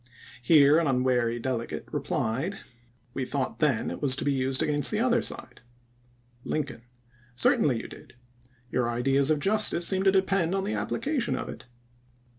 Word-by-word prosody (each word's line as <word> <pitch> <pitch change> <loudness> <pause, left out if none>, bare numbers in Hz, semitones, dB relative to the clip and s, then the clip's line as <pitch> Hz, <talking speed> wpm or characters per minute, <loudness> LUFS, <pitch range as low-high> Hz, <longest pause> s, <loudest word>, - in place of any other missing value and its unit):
Here 145 +3 +5
an 165 - 0
unwary 125 -3 +1
delegate 120 -1 -4
replied: 135 - -2 0.3
" 120 0 -36
We 135 - -3
thought 130 0 -3
then 145 -8 +1
it - - -7
was 135 -3 +2
to - - -4
be 145 - +1
used 130 0 +1
against 145 -2 +2
the 210 - -1
other 240 0 +2
side." - - -3 0.8
Lincoln: 145 -6 -4 0.5
"Certainly 120 0 +2
you - - -9
did. - - -14 0.6
Your 120 -2 0
ideas 135 +4 +1
of 155 -1 +2
justice 195 -1 +2
seem 190 -1 +2
to 195 0 +4
depend 190 -2 +1
on 195 - -1
the 205 - -3
application 275 -5 -2
of - - -5
it. - - -10
140 Hz, 165 wpm, -27 LUFS, 125-190 Hz, 0.8 s, Here